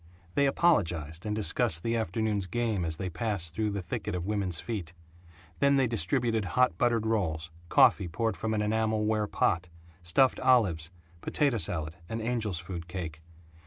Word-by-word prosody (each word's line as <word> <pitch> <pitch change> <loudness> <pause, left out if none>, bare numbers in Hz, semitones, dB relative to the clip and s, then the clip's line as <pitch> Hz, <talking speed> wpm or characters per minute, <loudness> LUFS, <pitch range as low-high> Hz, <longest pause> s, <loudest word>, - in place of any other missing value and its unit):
They 140 0 +3
apologized 85 - +1
and 105 - -1
discussed 90 -5 0
the 115 0 0
afternoon's 110 -1 -1
game 110 -2 -1
as 80 -1 -2
they 95 - -3
passed 85 -1 -2
through 110 -1 0
the 100 -2 -3
thicket 105 +1 -3
of 90 -1 -3
women's 100 -5 -1
feet. 90 -8 -5 0.6
Then 140 0 +4
they 135 -1 +4
distributed 115 - 0
hot 125 +6 +2
buttered 120 -2 +2
rolls, 85 -8 -1 0.2
coffee 95 - +5
poured 110 +7 -1
from 110 0 -2
an 105 - +1
enamel 110 0 +1
ware 110 -1 +1
pot, 90 -3 0 0.3
stuffed 125 +10 +3
olives, 100 -12 +3 0.3
potato 140 -6 +1
salad, 80 -2 -3
and 115 - -3
angel's 110 -5 -1
food 85 0 -6
cake. 85 -4 -6
105 Hz, 160 wpm, -29 LUFS, 85-115 Hz, 0.6 s, coffee